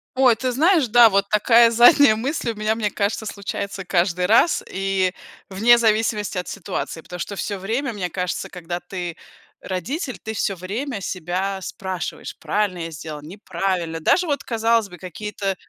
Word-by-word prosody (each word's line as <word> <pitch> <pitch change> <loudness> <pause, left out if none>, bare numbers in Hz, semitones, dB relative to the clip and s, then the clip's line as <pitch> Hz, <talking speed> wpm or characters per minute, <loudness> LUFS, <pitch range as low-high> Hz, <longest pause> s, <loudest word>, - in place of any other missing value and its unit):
Ой, 255 -3 +5
ты 255 +3 -2
знаешь, 315 +2 +3
да, 235 +1 +7
вот 200 -1 +2
такая 230 +2 +5
задняя 240 +1 +7
мысль 245 +1 -2
у - - -9
меня, 215 +1 0
мне 215 -2 -1
кажется, 205 +2 -2
случается 200 -1 -5
каждый 180 0 +1
раз, 225 - +4
и 190 -1 0 0.4
вне 225 +5 +5
зависимости 215 -3 +1
от 180 - -3
ситуации. 170 -3 -5
Потому 180 +2 -9
что 200 - -4
всё 200 +1 -3
время, 235 +7 -2
мне 185 -4 -3
кажется, 180 0 -3
когда 175 -1 -5
ты 175 -2 -6 0.5
родитель, 255 - -4
ты 220 - -6
всё 200 -2 -1
время 210 +7 -4
себя 185 +2 -3
спрашиваешь: 190 -1 -5
"Правильно 205 -4 -1
я 165 0 -5
сделал, 155 -1 -7
неправильно?" 175 -1 -3
Даже 360 - +3
вот, 285 -3 -1
казалось 230 -2 +1
бы, 180 - -11
какие-то, 195 +2 -4
200 Hz, 165 wpm, -22 LUFS, 180-230 Hz, 0.5 s, да